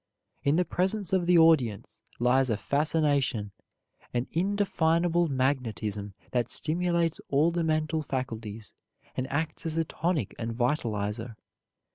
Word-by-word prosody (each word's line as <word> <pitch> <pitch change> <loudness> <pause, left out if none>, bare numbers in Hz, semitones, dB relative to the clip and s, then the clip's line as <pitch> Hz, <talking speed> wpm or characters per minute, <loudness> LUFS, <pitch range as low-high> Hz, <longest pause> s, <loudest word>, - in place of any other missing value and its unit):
In 140 +2 +3
the 180 +2 +2
presence 190 +2 -1
of 180 -2 +2
the 180 -1 +6
audience 145 -11 +3 0.2
lies 130 +2 +3
a 110 - +1
fascination, 140 -5 +1 0.6
an 120 +1 +1
indefinable 175 -2 +2
magnetism 115 -7 -1 0.2
that 125 -2 0
stimulates 170 +1 0
all 150 +5 +3
the 170 0 -1
mental 155 0 0
faculties, 115 -6 -5 0.4
and 130 +1 -3
acts 160 +3 -2
as 160 0 -2
a 165 - +2
tonic 155 - -1
and 115 -1 -3
vitalizer. 115 -3 -1
145 Hz, 125 wpm, -28 LUFS, 120-165 Hz, 0.6 s, the